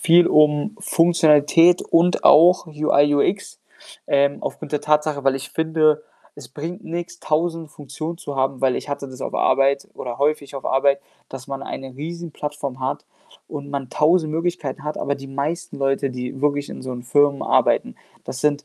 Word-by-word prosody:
viel 170 +1 +5
um 150 +8 +3
Funktionalität 165 0 +4
und 175 +2 +2
auch 175 +3 +6
UI, 150 -2 +2
UX, 185 +8 -1 0.5
ähm, 140 0 +2
aufgrund 145 - -6
der 150 - 0
Tatsache, 150 -1 0
weil 135 0 +2
ich 135 +1 -8
finde, 155 -1 +1 0.3
es 140 -4 -12
bringt 160 +6 -7
nix, 175 +1 -6
1.000 165 0 -1
Funktionen 155 +4 -7
zu 145 -4 -7
haben, 135 -1 -1
weil 130 -2 +2
ich - - -6
hatte 140 -1 -5
das 130 0 -12
auf - - -5
Arbeit 140 0 +2
oder 120 0 -6
häufig 145 -1 -1
auf 135 - -8
Arbeit, 140 +1 +2 0.3
dass 135 +1 -9
man 135 -1 -6
eine 135 -2 -7
Riesenplattform 150 -4 -6
hat 130 +1 -3 0.4
und 140 -1 -7
man 140 -3 -4
1.000 155 0 +2
Möglichkeiten 165 -4 -3
hat. 150 0 -4
Aber 140 0 -1
die 135 0 -10
meisten 145 +6 -4
Leute, 135 0 0
die 125 +1 -6
wirklich 145 -1 0
in - - -8
so 130 - -6
'n 120 -1 -7
Firmen 140 +2 +2
arbeiten, 60 - +1 0.3
das 125 - -6
sind 145 -1 0
145 Hz, 175 wpm, -21 LUFS, 135-160 Hz, 0.5 s, auch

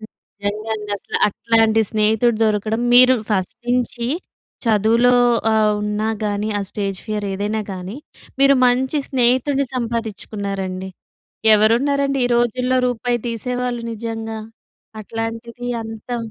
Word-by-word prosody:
నిజంగా 210 0 -7
అండి. 210 -1 -8
అసలు - - -3
అట్లాంటి 225 +1 +2
స్నేహితుడు 220 +2 +2
దొరకడం 215 +1 0
మీరు 255 +1 +8 0.2
ఫస్ట్ 190 -3 -1
నుంచి 245 -1 0 0.6
చదువులో 230 +3 +3 0.4
ఆహ్, 215 -1 +3
ఉన్నా 210 +1 -1 0.2
గాని, 205 +1 -1
ఆ - - -2
స్టేజ్ 195 -2 -3
ఫియర్ 210 -1 -3
ఏదైనా 205 +3 -2
గాని, 185 +4 -6 0.4
మీరు 275 0 +6
మంచి 260 +4 +1
స్నేహితుడిని 260 +2 +2
సంపాదించుకున్నారండి. 200 -5 -4 0.7
"ఎవరున్నారండి 275 +6 +2
ఈ - - +2
రోజుల్లో 250 +2 +1
రూపాయి 245 0 -1
తీసేవాళ్ళు" 245 +1 -3
నిజంగా, 225 0 -5 0.6
అట్లాంటిది 230 +2 -5
అంతా. 225 +2 -6
225 Hz, 110 wpm, -20 LUFS, 210-245 Hz, 0.7 s, మీరు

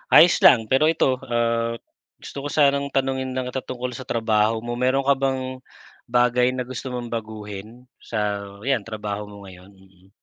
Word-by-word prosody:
Ayos 170 +1 +8
lang. 125 - +9
Pero 135 +4 +4
ito, 140 - +2 0.3
ah, 115 0 +1 0.5
gusto - - -9
ko - - -5
sanang 140 -1 +4
tanungin 130 -1 0
lang 130 -1 -1
kita 130 +1 -3
tungkol 125 0 -3
sa 130 - -8
trabaho 110 -1 +2
mo. 120 - -3
Meron 135 +1 +2
ka 140 - +5
bang 135 -1 +1 0.8
bagay 125 0 +3
na 125 - -2
gusto 130 +1 -5
mong 120 -1 -4
baguhin 105 -2 -7 0.4
sa - - -1 0.5
yan 120 -6 +1
trabaho 105 -1 -4
mo 100 - -11
ngayon? 95 0 -13
Mm. 95 0 -24
120 Hz, 170 wpm, -23 LUFS, 105-130 Hz, 0.8 s, lang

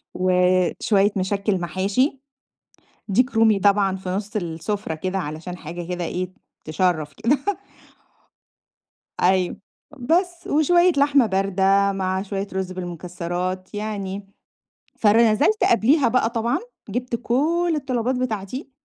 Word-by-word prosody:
وشوية 185 +3 +2
مشكّل 195 0 0
محاشي، 195 - 0 0.9
ديك 250 +6 +2
رومي 225 -2 +4
طبعًا 195 -1 +3
في 190 -1 -8
نُص 205 +4 -3
السفرة 175 +1 -3
كده 185 +4 -3
علشان 160 +2 -5
حاجة 170 +1 -7
كده 180 -1 -3
إيه، 180 +2 -3 0.3
تشرّف 155 -2 0
كده 235 +6 +1 1.8
أيوه، 185 0 +2 0.4
بس 345 +6 0
وشوية 345 +4 +4
لحمة 280 -2 +4
باردة 195 0 +2
مع 190 -1 -1
شوية 195 0 -4
رُز 190 -1 -3
بالمكسرات 180 +1 -5
يعني، 200 -2 -4 0.7
فر 210 0 +4 0.2
نزلت 315 - +2
قبليها 250 +3 +4
بقى 230 -1 +1
طبعًا، 235 0 0 0.3
جبت 245 +2 -2
كل 330 +8 +1
الطلبات 255 -3 -1
بتاعتي 250 +2 -4
200 Hz, 110 wpm, -22 LUFS, 185-240 Hz, 1.8 s, رومي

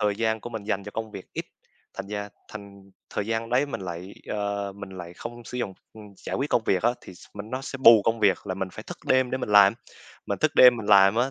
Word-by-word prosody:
thời 105 -1 +1
gian 110 0 0
của 120 - -8
mình 110 -3 -5
dành 100 -2 -2
cho 105 - -7
công 110 0 -5
việc - - -9
ít, - - -4 0.5
thành - - -6
ra 105 0 -5 0.2
thành 100 -2 -12 0.2
thời 105 - -3
gian 115 0 -2
đấy 130 +4 +2
mình 140 - -5
lại, 90 +1 -7
ờ, 100 -1 -3
mình 100 0 -9
lại 90 -2 -9
không 120 +4 -9
sử 125 - -6
dụng, 95 -6 -3 0.2
ừm, 110 -1 -11
giải - - -5
quyết 140 +3 -2
công 115 - +2
việc 95 -4 +1
á, 120 - +4
thì - - -12
s - - -16
mình 105 +2 -8
nó 130 +1 -3
sẽ 135 - -6
bù 115 -4 +8
công 115 0 0
việc, 100 0 +2
là 95 - -2
mình 95 0 -3
phải - - -9
thức - - -9
đêm 130 -1 +3
để 130 - -1
mình 125 - -4
làm. 100 0 +7 0.5
Mình 100 - -2
thức 155 -1 +1
đêm 125 -1 +8
mình 110 -3 -6
làm 100 0 +6
á, 125 +3 +1
105 Hz, 270 wpm, -25 LUFS, 100-115 Hz, 0.5 s, bù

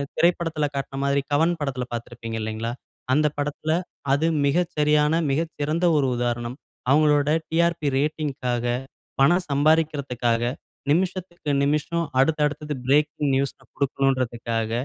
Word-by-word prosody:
திரைப்படத்தில 165 -2 +1
காட்டிய 135 0 -4
மாதிரி 140 0 +2
கவன் 165 +4 +3
படத்தில 135 -3 -2
பார்த்திருப்பீங்க, 115 -1 -5
இல்லீங்களா. 110 +2 -3 0.4
அந்த 150 +1 +4
படத்தில 145 +2 -2 0.4
அது 155 +4 +2 0.2
மிக 170 +6 +3
சரியான, 150 0 +3 0.2
மிகச்சிறந்த 160 +2 -1
ஒரு 140 -2 +2
உதாரணம். 120 0 -2 0.4
அவங்களுடைய 150 +1 +4
"TRP" 170 0 +1 0.2
ரேட்டிங்க்காக 135 -5 -1 0.6
பணம் 175 +6 +4
சம்பாரிகிறதுக்காக, 140 -6 +1 0.5
நிமிஷத்துக்கு 175 -2 -1
நிமிஷம், 150 +3 0
அடுத்த 155 +3 +3
அடுத்தது 150 0 -3
பிரேக்கிங் 145 0 +2
நியூஸ் 140 0 0 0.2
கொடுக்கனும்ன்றதுக்காக, 120 -5 0
145 Hz, 110 wpm, -24 LUFS, 130-155 Hz, 0.6 s, அந்த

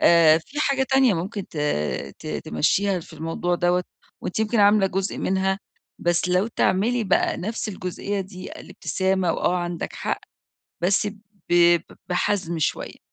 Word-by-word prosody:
آآ 165 -2 +6
في 290 - -6
حاجة 275 -2 +2
تانية 265 -5 +5
ممكن 190 +4 -4
ت - - -13 0.6
ت - - -11 0.2
تمشّيها 185 - +1
في 165 - -14
الموضوع 165 +3 -2
دوّة 175 +1 +1 0.4
وأنتِ 180 - -3
يمكن 220 0 +2
عاملة 205 -1 +5
جزء 190 +1 -2
منها، 190 0 0 0.4
بس 175 +1 +1
لو 180 +4 +2
تعملي 230 +2 +1
بقى 190 - +2
نَفْس 220 +3 -3
الجزئية 195 +1 -3
دي 185 -1 -8
الابتسامة 190 -2 -1
وآه 180 - +1
عندك 175 -1 -3
حق، - - -3 0.6
بس 195 +4 +2
ب 200 - -4 0.4
ب 175 -1 +6 0.3
بحَزْم 180 -2 0
شوية. 155 - -2
185 Hz, 145 wpm, -24 LUFS, 175-205 Hz, 0.6 s, آآ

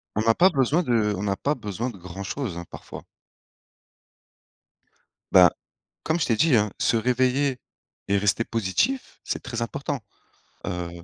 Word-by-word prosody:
on 110 - +1
n'a 115 +1 +4
pas 180 +9 +5
besoin 145 +1 +2
de 115 -6 +2
on 95 - -5
n'a 100 -1 0
pas 145 - 0
besoin 115 -1 -4
de 105 - -13
grand 90 +2 -7
chose, 100 -2 -4
hein, 85 - -6
parfois! - - -9 2.3
Bah, 90 -1 +8 0.5
comme 160 +2 0
je - - +1
t'ai 115 - +2
dit, 145 +1 +4
hein, 105 -1 +1
se 115 - +2
réveiller 130 +3 +1 0.5
et 100 - +3
rester 105 +3 +2
positif. 115 - -1
C'est - - -3
très 115 -1 -5
important, 140 +3 -3 0.6
heu, 90 -1 -3
115 Hz, 160 wpm, -25 LUFS, 100-140 Hz, 2.3 s, Bah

